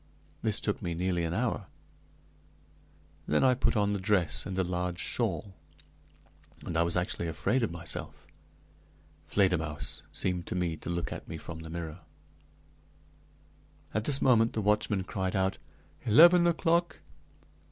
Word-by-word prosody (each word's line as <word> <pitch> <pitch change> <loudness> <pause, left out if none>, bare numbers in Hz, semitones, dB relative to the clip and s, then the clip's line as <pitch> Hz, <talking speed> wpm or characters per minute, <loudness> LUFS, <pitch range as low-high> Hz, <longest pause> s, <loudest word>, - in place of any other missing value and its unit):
This 110 0 0
took 105 - -2
me 85 -4 -3
nearly 90 0 0
an 85 - -2
hour. - - -1 1.6
Then 75 - +2
I 130 -1 +6
put 125 -2 +1
on 105 0 +2
the 100 - -1
dress 95 -7 0
and 95 -1 -4
a 95 - +2
large 90 0 -2
shawl, 100 +2 -2 1.1
and 85 - -4
I 80 - +3
was 85 +1 +1
actually 90 -1 -1
afraid 125 - 0
of 115 - +1
myself. 85 0 -5 1.0
Fledermausse 85 -5 0
seemed 90 -2 -2
to - - -3
me 90 -2 0
to - - -8
look 85 -1 -2
at - - -9
me 80 - -6
from 80 0 -8
the 80 0 -8
mirror. 85 0 -6 1.9
At 110 +1 -1
this 140 -1 +2
moment 115 -3 +4
the 110 - -1
watchman 105 -1 +1
cried 95 0 -3
out, 95 0 0 0.4
"Eleven 170 +9 +7
o'clock!" 170 0 +1
95 Hz, 145 wpm, -30 LUFS, 85-110 Hz, 1.9 s, Eleven